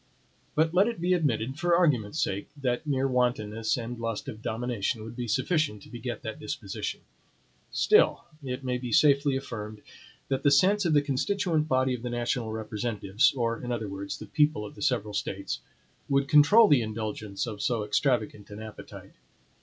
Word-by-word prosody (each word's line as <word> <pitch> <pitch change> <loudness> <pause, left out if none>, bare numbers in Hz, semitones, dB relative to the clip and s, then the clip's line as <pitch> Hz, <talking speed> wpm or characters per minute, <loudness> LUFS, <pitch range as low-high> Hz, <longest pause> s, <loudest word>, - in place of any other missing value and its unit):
But 160 +1 +2
let 190 +4 +5
it 235 -7 -3
be 180 +2 +2
admitted, 135 -5 0
for 175 0 +3
argument's 150 - +2
sake, 100 +1 -1
that 125 +2 -1
mere 135 -2 +1
wantonness 115 -4 0
and 120 0 -5
lust 115 -2 -3
of 110 - -7
domination 115 -1 -2
would 110 +1 -8
be 120 -1 -4
sufficient 115 - 0
to - - -15
beget - - -5
that - - -6
disposition; - - -5 0.7
still - - +3 0.2
it 130 0 -4
may 125 -1 -1
be 125 -1 -5
safely 145 -2 +4
affirmed, 110 -5 -7 0.4
that 135 -1 -1
the 145 - +4
sense 190 +8 +4
of 165 - +2
the 145 -1 +4
constituent 155 +3 0
body 130 -2 +2
of 125 - -4
the 125 - -4
national 120 -1 -1
representatives, 110 -1 0
or, 115 -2 -1
in 125 - -4
other 115 -3 -2
words, 100 0 -5
the - - -9
people 150 -6 +1
of 145 - -9
the - - -13
several 115 -8 0
States, 100 -1 -3 0.5
would 140 0 +2
control 150 +11 +7
the 145 -8 +5
indulgence 110 -2 -4
of 105 -3 -6
so 115 -3 0
extravagant 110 -1 0
an 105 0 -8
appetite. 110 0 -10
125 Hz, 175 wpm, -28 LUFS, 110-145 Hz, 0.7 s, control